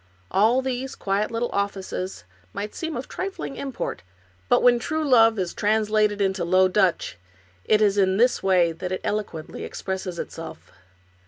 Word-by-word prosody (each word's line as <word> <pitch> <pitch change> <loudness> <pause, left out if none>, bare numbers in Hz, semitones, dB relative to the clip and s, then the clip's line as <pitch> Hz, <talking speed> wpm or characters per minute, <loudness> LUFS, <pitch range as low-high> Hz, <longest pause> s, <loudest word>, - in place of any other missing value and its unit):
All 225 +7 +3
these 260 0 -3
quiet 200 +2 -1
little 230 +1 -2
offices 195 - -3 0.3
may 205 - -2
seem 325 -2 -4
of 250 - -5
trifling 380 -7 -5
import, 270 -2 -4 0.5
but - - +4
when 245 -1 +5
true 310 +5 -2
love 225 -4 +5
is 185 -3 -2
translated 215 -1 +1
into 190 -2 0
Low 185 +2 +4
Dutch 185 - +1 0.5
it 215 0 +4
is 205 -1 +3
in 190 -1 +3
this 245 +3 +3
way 180 -3 +3
that 180 +3 -6
it 185 - -2
eloquently 200 -7 -4
expresses 190 -2 -5
itself. 165 -1 -8
205 Hz, 155 wpm, -24 LUFS, 190-240 Hz, 0.5 s, when